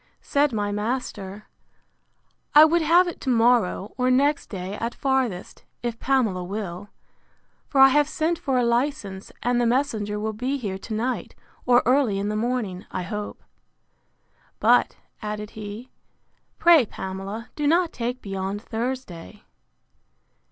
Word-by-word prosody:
Said 285 0 +2
my 205 -2 -1
master, 210 -2 -4 1.1
I 305 +1 +10
would 335 +2 +2
have 340 +3 +5
it 345 - -6
to 265 - -3
morrow, 230 -4 +2
or 250 0 +2
next 285 +3 +2
day 190 -1 -5
at 230 +1 -3
farthest, 260 -9 -1 0.2
if 235 -1 -3
Pamela 230 -9 +1
will: 195 0 -5 0.8
for 275 - 0
I 270 0 +9
have 295 +2 +3
sent 325 +2 -1
for 265 -2 0
a 245 - +2
license, 235 -5 -1
and 245 +1 +2
the 240 - +2
messenger 225 -5 0
will 220 +1 -2
be 255 +6 -2
here 200 -7 -4
to 215 +2 -5
night, 245 +4 -3 0.3
or 245 0 +5
early 250 -5 +3
in 200 +1 -2
the 210 - -2
morning, 220 -5 -2
I 185 - -4
hope. 210 +3 -6 1.2
But, - - +3 0.2
added 210 0 -5
he, 215 +4 -8 0.7
pray, 330 -9 +6
Pamela, 195 +5 -6
do 295 -1 -1
not 335 +2 +2
take 245 +1 -4
beyond 195 0 -3
Thursday. 225 -5 -5
235 Hz, 145 wpm, -24 LUFS, 205-265 Hz, 1.2 s, I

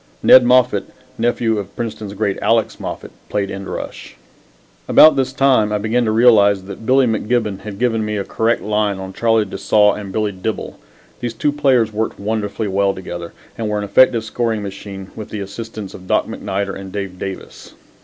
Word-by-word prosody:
Ned 130 - +8
Moffat, 125 -4 +3 0.3
nephew 115 -2 +1
of 100 -1 -8
Princeton's 110 -3 -5
great 100 -1 -1
Alex 115 -1 +1
Moffat, - - -6 0.2
played 100 -1 -1
end 95 0 -6
rush. - - -7 0.7
About 155 - +7
this 130 -1 0
time 130 -6 +3
I 105 - +1
began 110 +4 0
to 110 - +1
realize 105 -4 +5
that 100 +3 -9
Billy 130 0 +4
McGibbon 110 -2 -1
had 105 -1 -8
given 115 -1 0
me 105 0 -2
a 100 - -2
correct 115 +4 0
line 105 -1 0
on 95 0 -7
Charlie 115 -1 +2
de 95 - -7
Saulles 105 +1 +3
and 100 -2 -7
Billy 105 0 -1
Dibble. 100 +3 -5 0.4
These 120 -2 -4
two 145 +6 +1
players 130 -7 +2
worked 110 +1 -2
wonderfully 105 0 -2
well 100 0 +1
together, 85 -2 -7 0.3
and 110 -2 -2
were 105 - -1
an 105 - -2
effective 115 +3 +4
scoring 110 -1 -2
machine 100 -1 -8
with 110 -1 -8
the 105 - -5
assistance 105 0 -7
of 95 - -12
Doc - - +2
MacNider 100 0 -4
and 95 -1 -8
Dave 95 -2 -5
Davis. 95 -1 -8
105 Hz, 185 wpm, -18 LUFS, 100-115 Hz, 0.7 s, Ned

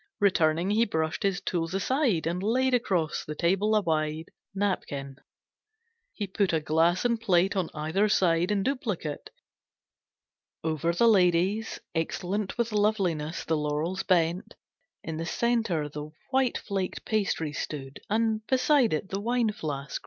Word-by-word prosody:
Returning, 175 -2 +2
he 220 +2 +4
brushed 160 -7 -1
his 195 -1 0
tools 170 0 -2
aside, 230 - +1
And 175 +2 -1
laid 255 +5 +1
across 185 -10 0
the 150 - -6
table 195 +7 +2
a 215 - +4
wide 155 -1 -1 0.3
Napkin. 140 -9 -2 1.0
He 210 - -2
put 195 -1 0
a 160 - +3
glass 165 +6 +2
and 235 -2 +1
plate 190 -2 +2
On 185 -4 0
either 160 +8 +1
side, 175 -3 +2
in 205 -2 +1
duplicate. 215 - -3 1.3
Over 160 +1 0
the 230 +7 +3
lady's, 190 +1 +2
excellent 185 +5 -2
With 235 -1 0
loveliness, 190 -7 0
the 160 - +1
laurels 150 +5 -1
bent. 175 0 +1 0.5
In 160 -1 -4
the 165 - -3
centre 225 -11 0
the 150 +1 -7 0.2
white 265 -2 +2
flaked 195 -2 -4
pastry 195 -8 -1
stood, 140 -2 -5
And 220 0 +1
beside 260 - +3
it 155 +5 -2
the 195 +1 -3
wine 235 0 +1
flask. 145 -9 -4
185 Hz, 145 wpm, -28 LUFS, 160-215 Hz, 1.3 s, he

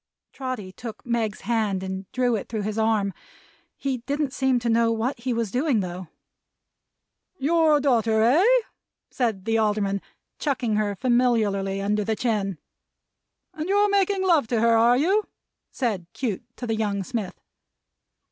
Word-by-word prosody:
Trotty 255 -8 -5
took 220 +2 -9
Meg's 230 -3 -1
hand 215 -5 0
and 190 0 -6
drew 250 -2 +1
it 210 - -5
through 220 -2 -3
his 215 +1 -2
arm. 215 -3 +1 0.6
He 270 -2 -2
didn't 280 +2 -2
seem 265 -2 +2
to 240 0 -2
know 230 0 +3
what 230 +3 -1
he 250 +2 -2
was 230 -4 -1
doing 255 -2 +1
though. 180 -1 -6 1.3
"Your 315 0 +3
daughter, 230 -5 +2
eh?" 285 - +5 0.7
said 220 -7 -1
the 225 0 +2
Alderman, 205 -2 0 0.4
chucking 250 -7 0
her 210 -1 0
familiarly 215 -5 +1
under 210 +1 +1
the 220 +2 -1
chin. 210 -6 -1 1.0
"And 315 +3 -5
you're 410 +1 +3
making 395 -1 +2
love 325 -10 +3
to 230 -1 0
her, 230 0 +4
are 235 +2 +5
you?" 385 +9 +2 0.4
said 210 -9 -2
Cute 235 -5 -3
to 245 - -5
the 225 -2 -1
young 205 -3 -1
smith. 210 -2 -4
230 Hz, 150 wpm, -24 LUFS, 210-255 Hz, 1.3 s, eh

